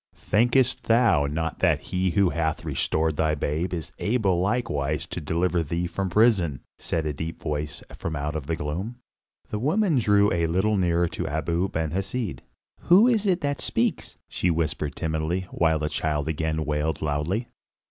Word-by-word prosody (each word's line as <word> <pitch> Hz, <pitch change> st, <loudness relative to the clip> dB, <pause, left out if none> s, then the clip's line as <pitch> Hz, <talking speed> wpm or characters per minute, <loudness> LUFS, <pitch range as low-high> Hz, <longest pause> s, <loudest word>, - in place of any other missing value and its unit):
"Thinkest 120 Hz, +5 st, +2 dB
thou 115 Hz, -11 st, +4 dB
not 80 Hz, +3 st, -3 dB
that -, -, +3 dB
he 95 Hz, 0 st, -1 dB
who 90 Hz, +1 st, +2 dB
hath 80 Hz, 0 st, -1 dB
restored 80 Hz, +1 st, 0 dB
thy 80 Hz, -1 st, +2 dB
babe 75 Hz, +5 st, -2 dB
is 85 Hz, -4 st, -4 dB
able 100 Hz, -6 st, +1 dB
likewise 85 Hz, -, -1 dB
to -, -, -5 dB
deliver 85 Hz, +3 st, 0 dB
thee 85 Hz, +3 st, -2 dB
from 95 Hz, +2 st, -2 dB
prison?" 90 Hz, -, +3 dB, 0.2 s
said 80 Hz, -2 st, -2 dB
a 75 Hz, -, -1 dB
deep 80 Hz, +3 st, -5 dB
voice 75 Hz, -1 st, -4 dB
from 80 Hz, -, -4 dB
out 75 Hz, +1 st, -2 dB
the 80 Hz, -, 0 dB
gloom. 85 Hz, +11 st, -4 dB, 0.6 s
The 105 Hz, -, -2 dB
woman 160 Hz, -, +2 dB
drew 105 Hz, -2 st, +3 dB
a 85 Hz, -1 st, +1 dB
little 95 Hz, +6 st, +1 dB
nearer 85 Hz, -2 st, +2 dB
to -, -, -4 dB
Abu 85 Hz, +5 st, -1 dB
Ben 80 Hz, -3 st, -2 dB
Hesed. 100 Hz, +3 st, -3 dB, 0.4 s
"Who 190 Hz, +7 st, +6 dB
is 220 Hz, -4 st, +2 dB
it 180 Hz, -2 st, +2 dB
that 145 Hz, -1 st, -1 dB
speaks?" -, -, -1 dB
she 90 Hz, -, -1 dB
whispered 80 Hz, -3 st, -1 dB
timidly, 80 Hz, +2 st, -1 dB
while 80 Hz, -1 st, +2 dB
the 75 Hz, 0 st, -2 dB
child 75 Hz, -1 st, -1 dB
again 80 Hz, 0 st, -1 dB
wailed 75 Hz, +2 st, -1 dB
loudly. 80 Hz, -, -1 dB
85 Hz, 170 wpm, -25 LUFS, 80-105 Hz, 0.6 s, Who